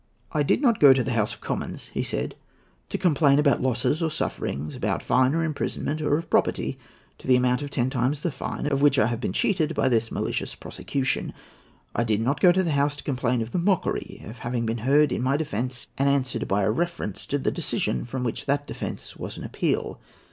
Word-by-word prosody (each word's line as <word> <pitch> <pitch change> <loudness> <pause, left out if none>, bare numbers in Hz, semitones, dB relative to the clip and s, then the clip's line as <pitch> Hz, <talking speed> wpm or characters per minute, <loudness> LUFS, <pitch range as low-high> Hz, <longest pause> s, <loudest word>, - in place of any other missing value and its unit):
"I 150 - +1
did 145 - +2
not 235 -5 +4
go 140 -2 +9
to 130 -1 +1
the 130 - -2
House 110 -2 +1
of - - -24
Commons," - - -4
he - - -1
said, - - -3 0.6
"to - - -2
complain 145 -6 +4
about 145 -4 +3
losses 130 +5 +1
or 165 - +1
sufferings, 75 - -3
about - - -1
fine 130 +3 +3
or 165 - +1
imprisonment; 155 -1 -2
or 150 -1 +2
of 165 - -5
property, - - +1 0.4
to - - -11
the 130 - +6
amount 125 +1 +2
of 145 - -4
ten 130 -2 0
times 135 +2 0
the 170 - -1
fine, 130 - -4
of 140 -2 +1
which 145 -1 +5
I 105 - +5
had 115 0 -2
been - - -1
cheated 165 - +1
by 130 - +2
this 115 -2 +1
malicious - - -2
prosecution. 135 -1 -2 0.6
I 120 - +1
did 110 -3 +1
not 135 +5 0
go 180 - +8
to 190 +1 +2
the 170 - 0
House 145 0 +2
to 145 - -10
complain 125 -3 0
of 110 - -9
the - - 0
mockery 185 +1 -1
of 110 +2 -9
having 120 0 -2
been 115 +1 -1
heard 140 +4 +4
in - - -1
my 135 +3 +2
defence, 125 -4 -3
and 140 +1 +3
answered 135 -2 0
by 100 +1 +1
a 105 - +2
reference 170 - -3
to 145 - 0
the 135 - 0
decision 65 - -1
from 125 +2 -4
which 120 +2 -3
that 145 +1 +1
defence - - -6
was - - -6
an - - -7
appeal. - - -1
135 Hz, 225 wpm, -25 LUFS, 120-150 Hz, 0.6 s, go